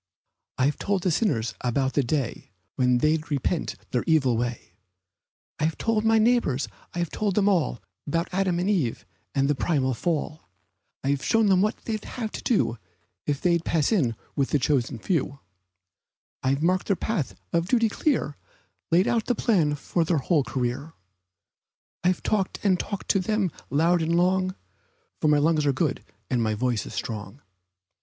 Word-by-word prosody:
I've 140 +3 +1
told 195 -3 0
the 185 - +2
sinners 125 - 0
about 130 +2 0
the 145 - +3
day 135 0 -2 0.3
When 125 -1 +3
they'd 155 +4 +1
repent 150 +3 -1 0.2
their 125 - 0
evil 135 -7 +3
way; 120 -5 -3 0.9
I 150 - +2
have 160 - -1
told 225 -1 +1
my 225 0 +4
neighbors, 220 - +2 0.3
I - - -4
have 170 -2 -1
told 205 -3 -1
them 205 -1 +3
all 175 - +2 0.3
'Bout 165 +4 0
Adam 185 -1 +1
and 180 +2 0
Eve, 170 - 0 0.3
and 135 0 +3
the 145 - +3
primal 135 -3 0
fall; 155 - -3 0.5
I've 140 +1 0
shown 225 +2 +3
them 185 -1 +5
what 215 +2 +1
they'd 215 -2 -3
have 225 -4 -5
to - - -6
do 160 - +1 0.5
If 145 -2 -1
they'd 170 -2 +2
pass 160 0 +1
in 135 - +2 0.2
with 135 -1 +1
the - - +3
chosen 135 -2 0
few; 140 - -1 1.0
I've 135 +3 0
marked 185 +2 +2
their 200 - +3
path 155 - -2 0.2
of 170 0 +1
duty 230 +1 +3
clear 215 - 0 0.5
Laid 175 +4 +4
out 230 -2 +1
the 245 - +2
plan 165 -12 +2
for 165 +4 -1
their 165 0 +1
whole 145 +2 +2
career; 130 +5 -3 1.1
I've 180 0 +1
talked 200 -3 0
and 185 -3 +3
talked 200 -3 -4
to 195 +1 +1
'em, 210 -5 +1 0.2
loud 165 +4 +3
and 165 +1 +1
long, 185 +1 +2 0.6
For 155 - +1
my 150 -1 +5
lungs 155 +1 +3
are - - +5
good 145 0 -1 0.2
and 125 -3 0
my 110 -1 +1
voice 120 0 -1
is - - -8
strong. 115 +3 -5
160 Hz, 175 wpm, -26 LUFS, 135-190 Hz, 1.1 s, them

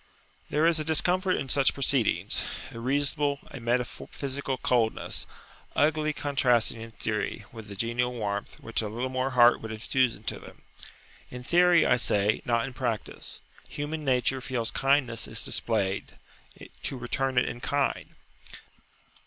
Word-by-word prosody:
There 150 +2 +2
is 165 -1 +4
a - - -1
discomfort 180 +4 +2
in - - -3
such 135 +1 +3
proceedings, 135 -4 +1 0.3
a 115 - -8
reasonable, 140 +3 +1
[p.52]a 135 - -8
metaphysical 130 +3 -2
coldness, 120 -3 0 0.5
uglily 155 +1 +2
contrasting 125 -6 +1
in 115 - -7
theory 110 -1 -3
with 110 -2 -10
the 100 - -8
genial 120 +4 0
warmth 105 -4 -4
which 115 - -1
a 110 - -3
little 120 +5 -3
more 130 +1 0
heart 120 -2 +5
would 110 - -6
infuse 120 +3 +1
into 105 +2 -4
them. - - -14 0.7
In 125 0 -8
theory, 175 +3 +5
I - - +4
say, 105 -2 +2
not 115 -1 +1
in 130 - -7
practice. 120 -4 -4 0.3
Human 150 +2 -4
nature 130 -1 +2
feels 125 -3 -1
kindness 135 -4 +1
is - - -1
displayed 100 -4 -1 0.6
to 135 - -2
return 130 +2 -1
it 125 - +5
in 120 - -5
kind. 140 -1 -1
125 Hz, 145 wpm, -28 LUFS, 115-140 Hz, 0.7 s, heart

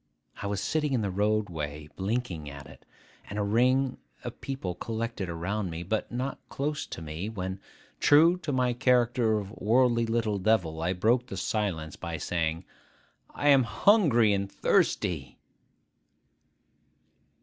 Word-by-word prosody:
I 100 - -2
was 100 -1 -2
sitting 150 +4 0
in 120 -4 +1
the 100 - -1
road 105 +2 +1
way, 75 -3 -5
blinking 95 -7 -2
at 70 0 -9
it, 75 - -15 0.4
and 100 - -5
at - - +1
a - - -1
ring 125 +5 +2 0.2
of - - -7
people 135 -10 -4
collected 115 -1 -4
around 90 +4 -2
me, 85 +1 -5
but 105 +5 -2
not 130 +3 -3
close 145 +1 -3
to 85 - -7
me, 80 +7 -5
when, 95 -3 -4 0.4
true 165 +5 +6
to 155 - -3
my 125 -2 +1
character 120 -2 +2
of 100 -1 -5
worldly 115 +2 +2
little 115 -3 0
devil, 90 -6 +1
I 85 +3 0
broke 120 +7 +1
silence 90 -8 -2
by 85 -3 -5
saying, 80 +1 -2 0.7
'I 145 - -1
am 135 -2 +7
hungry 120 - +4
and 100 0 -2
thirsty! - - 0
105 Hz, 150 wpm, -28 LUFS, 90-125 Hz, 0.7 s, am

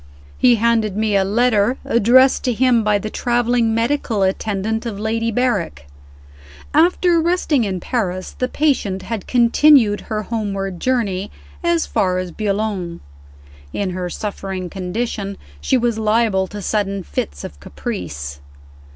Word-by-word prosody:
He 245 -1 +5
handed 220 -3 +1
me 215 -1 +1
a 195 - +4
letter 225 +3 +2
addressed 250 +4 +4
to 250 - +1
him 240 -1 +3
by 210 -1 +3
the 215 +2 -5
traveling 240 -1 +1
medical 230 -3 0
attendant 210 +3 -1
of 220 -4 -5
Lady 225 +2 -1
Berrick. 220 - -1 0.9
After 340 +2 +3
resting 320 -7 +1
in 190 -2 -2
Paris, 185 -4 -2
the 255 - +1
patient 250 -10 0
had 225 -4 -5
continued 240 -2 +4
her 215 -1 -4
homeward 195 -4 -3
journey 205 -6 -1 0.3
as 340 -1 +2
far 185 -1 0
as 185 -1 -3
Boulogne. 200 -4 -2 0.7
In 200 -2 -2
her 180 0 -4
suffering 190 -2 -5
condition, 200 +1 -3 0.2
she 260 - +2
was 235 -2 0
liable 215 -3 +2
to 205 +1 -8
sudden 200 -2 -1
fits 70 - -4
of 70 - -9
caprice. 70 -2 -6
215 Hz, 135 wpm, -19 LUFS, 195-240 Hz, 0.9 s, He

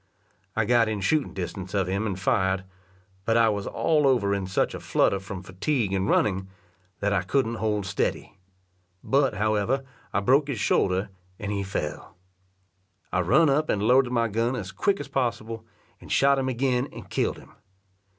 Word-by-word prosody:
I 110 - +1
got 115 0 +3
in 105 -2 -2
shooting 145 +9 +1
distance 95 +1 -5
of 95 -2 +2
him 100 +4 -1
and 95 -2 -3
fired, 95 -1 +1 0.6
but 115 +3 +2
I 115 -1 +5
was 100 -2 -2
all 150 -3 +2
over 110 -7 +2
in 100 -2 -2
such 95 - 0
a - - -5
flutter 100 - +1
from 95 -1 -7
fatigue 100 +3 -1
and 95 +1 0
running, 95 -2 +1 0.5
that 100 0 +1
I 100 - +2
couldn't 115 +4 0
hold 105 -2 0
steady; 95 0 -2 0.6
but, 135 -4 +2
however, 110 +5 +1 0.3
I - - +1
broke 135 +7 +3
his 135 -7 -3
shoulder, 95 0 +1 0.3
and 105 +1 -4
he 100 -1 -1
fell. 75 -7 -5 1.0
I 90 - +2
run 135 - +4
up 150 +3 +2
and 100 - +1
loaded 125 +2 +4
my 115 -2 +2
gun 115 +4 0
as 100 -5 -5
quick 195 - 0
as - - -6
possible, 115 -4 -2 0.3
and - - -12
shot 140 0 +4
him 130 0 -1
again 125 +1 0
and - - -10
killed - - -1
him. - - -16
110 Hz, 180 wpm, -26 LUFS, 95-130 Hz, 1.0 s, I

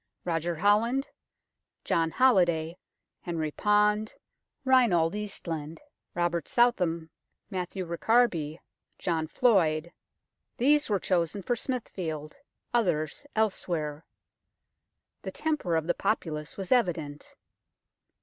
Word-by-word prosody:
Roger 170 0 -1
Holland, 215 - +2 0.8
John 165 -1 +2
Holiday, 175 -6 +3 0.4
Henry 160 -3 -3
Pond, 210 +3 +2 0.5
Reinald 225 -11 +4
Eastland, 165 -7 -4 0.4
Robert 175 -1 0
Southam, 175 -10 +2 0.4
Matthew 185 0 -3
Ricarby, 170 -4 +1 0.4
John 160 -3 -1
Floyd 170 -7 +2 0.7
these 290 +3 +3
were 200 -2 +2
chosen 180 +1 0
for 245 - 0
Smithfield; 175 - -4 0.4
others 180 - 0
elsewhere. 165 -8 -1 1.2
The - - -5
temper 300 - -1
of 160 -1 0
the 175 - +1
populace 160 -7 -2
was 195 -2 -6
evident. 165 - 0
175 Hz, 90 wpm, -28 LUFS, 160-215 Hz, 1.2 s, Reinald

